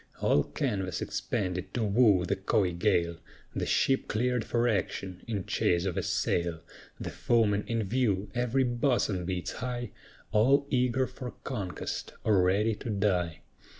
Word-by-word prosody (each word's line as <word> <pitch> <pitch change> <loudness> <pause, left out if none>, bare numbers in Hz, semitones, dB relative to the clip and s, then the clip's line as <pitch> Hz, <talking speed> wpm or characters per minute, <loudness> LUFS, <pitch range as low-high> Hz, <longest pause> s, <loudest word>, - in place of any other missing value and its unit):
All 75 - +3
canvas 95 - -2
expanded 90 -2 -3
to 120 - +1
woo 105 -3 +4
the 100 - 0
coy 95 -1 +1
gale, 85 -3 +1 0.4
The - - -1
ship 135 0 +2
cleared 125 +1 0
for 120 0 +1
action, 95 -3 -2
in 105 -5 -2
chase 85 +1 +1
of 95 - -1
a - - 0
sail; 85 -2 0 0.4
The - - -4
foemen 105 -3 +2
in 115 -1 0
view, 105 -3 0
every 125 +2 +1
bosom 120 -7 +1
beats 90 -1 -2
high, 120 -2 -4 0.4
All 135 +7 +4
eager 125 0 +2
for 125 -1 -8
conquest, 95 -3 -4
or 105 -4 +4
ready 100 +5 +2
to - - -6
die. 95 -6 0
105 Hz, 150 wpm, -29 LUFS, 90-120 Hz, 0.4 s, woo